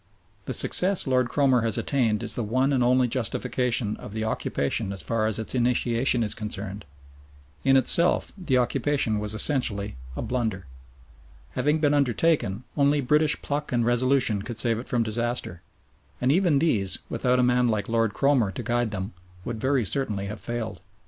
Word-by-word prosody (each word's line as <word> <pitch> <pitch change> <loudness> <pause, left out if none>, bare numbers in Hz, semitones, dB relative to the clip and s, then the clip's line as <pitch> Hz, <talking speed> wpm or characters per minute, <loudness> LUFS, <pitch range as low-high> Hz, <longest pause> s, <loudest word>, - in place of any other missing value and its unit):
The - - -4
success 190 +1 +4
Lord 125 -2 +1
Cromer 130 -4 +2
has 115 -2 +1
attained 115 -7 0
is - - -2
the - - -2
one 130 +6 0
and 130 -2 +2
only 125 +1 +3
justification 120 -2 -1
of 105 - -10
the 110 0 -3
occupation 100 -2 -2
as 95 - -5
far 115 -1 -1
as 110 - -1
its 110 - -5
initiation 120 0 +1
is 105 - 0
concerned. 105 -2 -6 0.8
In 135 0 +4
itself 170 +7 +4
the 165 -10 -1
occupation 125 -2 0
was 105 +1 -1
essentially 110 - +1 0.2
a - - -4
blunder. 110 -7 -3 0.9
Having 150 +2 0
been 145 -2 +2
undertaken, 130 - +1
only 145 0 +2
British 150 +3 +2
pluck 150 +1 -3
and 120 -2 +1
resolution 120 -3 +2
could 115 +2 -7
save 115 -1 +1
it 120 - -9
from 120 -2 +1
disaster, 115 -5 -3 0.6
and 125 +2 +1
even 170 -2 +2
these, 110 - +1
without 125 -1 0
a 125 - +2
man 125 0 +2
like 110 -3 -1
Lord 115 -2 0
Cromer 135 -7 +2
to - - -6
guide 120 -1 0
them, 100 0 -5 0.3
would 115 -2 -5
very 130 -2 +1
certainly 105 -4 -2
have 105 +2 -7
failed. 120 -2 -5
120 Hz, 170 wpm, -25 LUFS, 110-135 Hz, 0.9 s, success